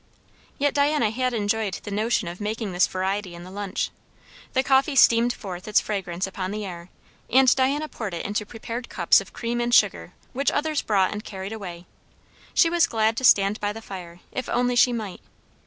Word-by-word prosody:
Yet 285 0 +1
Diana 285 -6 +2
had 255 +2 0
enjoyed 215 -3 -1
the 205 - -7
notion 215 -1 0
of 175 +4 -7
making 215 0 -3
this 180 0 +3
variety 190 0 -2
in 170 - -10
the 185 - -11
lunch. 200 0 -3 0.6
The 260 - +2
coffee 270 +2 +3
steamed 235 -1 +5
forth 190 -5 -7
its 210 - +4
fragrance 190 -3 -3
upon 190 -1 -4
the 210 +1 -4
air; 175 -1 -8 0.4
and 260 0 +5
Diana 280 +3 +1
poured 210 - -5
it 170 - -5
into 210 +1 -1
prepared 230 +3 -7
cups 175 0 +4
of 195 - -12
cream 240 0 -3
and 240 0 -1
sugar 85 - +3 0.2
which 275 +3 +1
others 305 0 0
brought 195 -3 +2
and 210 0 -5
carried 195 0 -6
away; 180 -5 -8 0.7
she - - +6
was 340 0 +3
glad 220 0 +1
to - - -3
stand 200 -3 +5
by 205 0 -1
the 220 - -7
fire 180 -5 -9
if 255 - -4
only 245 0 +1
she 245 +1 +5
might. 215 -5 -5
215 Hz, 195 wpm, -24 LUFS, 190-245 Hz, 0.7 s, she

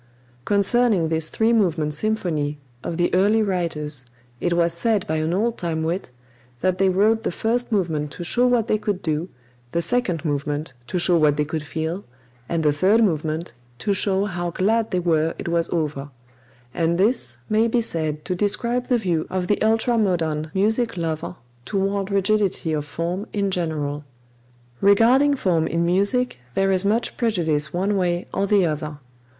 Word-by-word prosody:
Concerning 200 -3 +3
this 160 -1 0
three 225 +1 +2
movement 165 -8 +1
symphony 155 -6 -1 0.3
of 170 - -4
the 175 - +1
early 205 +4 +3
writers, 155 - -2 0.3
it 175 - -1
was 170 -1 +2
said 210 +2 +1
by 160 - -1
an 155 +1 -1
old 225 +6 0
time 160 -2 -2
wit 170 -1 -2 0.5
that 185 0 +1
they 195 0 +4
wrote 215 +4 +3
the 230 - -2
first 235 +6 -1
movement 160 -8 0
to 175 - -7
show 245 +8 +2
what 240 -3 +2
they 215 - +1
could 205 -3 -3
do, 160 +2 -1 0.4
the 170 - +1
second 175 -3 0
movement 145 0 -2
to 180 - -2
show 175 0 +4
what 150 -2 +3
they 150 - +1
could 155 +1 -3
feel, 160 +5 -4 0.5
and 165 -1 0
the 150 - +4
third 195 +10 +3
movement 160 - -1 0.2
to 200 - 0
show 195 0 +2
how 175 -3 -3
glad 220 +6 +1
they 185 - -1
were 165 -2 +1
it - - -6
was 170 0 0
over 150 -4 -2 0.6
and 170 0 +1
this 195 - +1
may 220 +2 +2
be 235 +1 +1
said 155 -8 -1
to 185 - -1
describe 235 +6 -1
the 250 - +3
view 175 -8 -1
of 185 -1 -2
the 205 +3 0
ultra 225 +2 +2
modern 160 -6 0
music 220 +2 +1
lover 160 -2 -3 0.3
toward 195 - -1
rigidity 195 -4 +1
of 150 -1 -2
form 170 +7 -4
in 200 -2 0
general. 150 -5 -2 0.8
Regarding 245 +8 +5
form 170 -10 +1
in 170 +1 0
music 200 - +1 0.2
there 195 0 +2
is 185 0 +2
much 215 +4 0
prejudice 160 -10 0
one 195 +4 0
way 175 -2 0
or 195 +1 0
the 200 -2 +4
other. 150 -1 -3
180 Hz, 175 wpm, -22 LUFS, 160-210 Hz, 0.8 s, Regarding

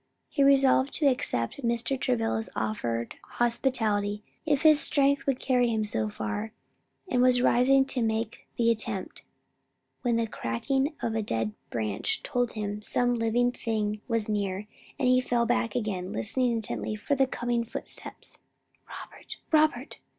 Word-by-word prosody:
He 280 - -1
resolved 275 -1 +4
to 305 - +1
accept 250 - 0
Mr. 235 +2 0
Travilla's 115 - -1
offered 115 +2 -2 0.2
hospitality, 220 -4 0 0.2
if 290 -1 +2
his 310 -2 +7
strength 280 -2 +2
would 270 -2 +1
carry 250 -2 +2
him 220 -1 0
so 110 - 0
far, 160 - -4 0.5
and 250 -9 +1
was 250 0 +4
rising 265 +3 +5
to 265 -2 -2
make 225 0 -2
the 230 -1 +4
attempt, 215 -4 -3 0.8
when 240 -2 +1
the 230 0 +1
cracking 265 - -1
of 230 - 0
a 220 - 0
dead 110 - -2 0.2
branch 110 -3 -2
told 245 -1 -1
him 210 -1 -3
that 210 - -18
some 245 0 +1
living 240 +1 +1
thing 215 -3 -2
was 230 -3 0
near, 200 -2 -2 0.3
and 260 - +1
he 255 0 +5
fell 240 -2 +1
back 230 -1 0
again, 200 -6 -2
listening 245 - 0
intently 220 -1 -2
for 220 +7 -2
the 270 -1 +3
coming 240 -2 -1
footsteps. 230 - -8 0.5
"Robert! - - -9
Robert!" 305 -4 +2
230 Hz, 150 wpm, -28 LUFS, 205-255 Hz, 0.8 s, his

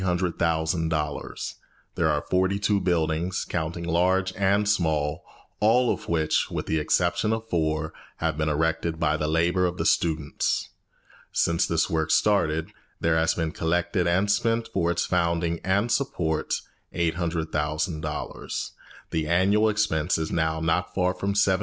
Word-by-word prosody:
There 95 - +1 2.0
are 75 -1 0
forty 95 +2 +2
two 100 0 +1
buildings, 85 +1 0
counting 85 0 -3
large 90 +2 +1
and 100 +1 +2
small, 80 -7 0 0.4
all 120 +3 +4
of - - -8
which, 80 -2 +1
with - - -3
the 80 - 0
exception 85 +7 +1
of 110 0 -2
four, 80 -1 0 0.2
have 80 -1 -1
been 75 0 0
erected 80 +1 0
by 75 -1 +2
the 75 -1 -1
labour 85 +3 +2
of 90 0 -4
the - - -2
students. 80 -3 0 0.6
Since 85 0 +1
this 85 -1 +1
work 80 -1 -1
started, 80 -7 +2 0.3
there 80 0 +2
has 80 0 +2
been 80 -2 -1
collected 85 +3 0
and 95 +4 +2
spent 115 +1 +1
for 85 -3 +1
its 85 - 0
founding 85 -1 0
and 100 +5 +1
support 85 - 0 0.4
$800,000. 80 -2 -2 0.4
The 80 -1 -1
annual 100 +6 +3
expense 95 -6 +1
is 80 -1 -3
now 80 -1 0
not 80 +3 0
far 90 -1 +2
from 100 +2 -2
$75,000. 95 -2 +3
85 Hz, 140 wpm, -25 LUFS, 80-95 Hz, 2.0 s, all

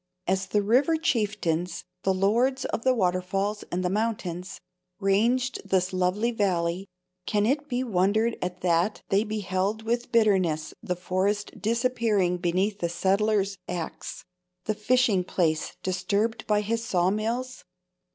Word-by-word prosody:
As 190 +1 0
the 205 +2 +1
river 265 +10 +3
chieftains, 200 - -1 0.2
the 190 - +1
lords 235 +8 +2
of - - -2
the 260 -1 +3
waterfalls 195 +1 0
and 180 +1 -1
the - - +2
mountains, 190 -4 -2 0.4
ranged 235 +6 +1
this 190 -2 0
lovely 185 +6 +1
valley, 185 -3 0 0.4
can 210 -1 +2
it 290 +5 0
be 250 0 0
wondered 220 +1 +2
at 180 0 -4
that 175 +3 +1
they 195 +2 +3
beheld 210 0 -2
with 235 +2 -1
bitterness 185 -9 +2
the 180 -5 -2
forest 190 +4 -1
disappearing 225 -5 +1
beneath 190 +4 0
the 170 - -1
settler's 195 +2 +1
axe—the 180 +2 -6
fishing 215 -2 +2
place 160 -3 -1
disturbed 200 +4 -1
by 210 -1 +3
his 225 +2 -1
saw 180 -4 +2
mills? 235 +5 -2
200 Hz, 130 wpm, -26 LUFS, 180-225 Hz, 0.4 s, river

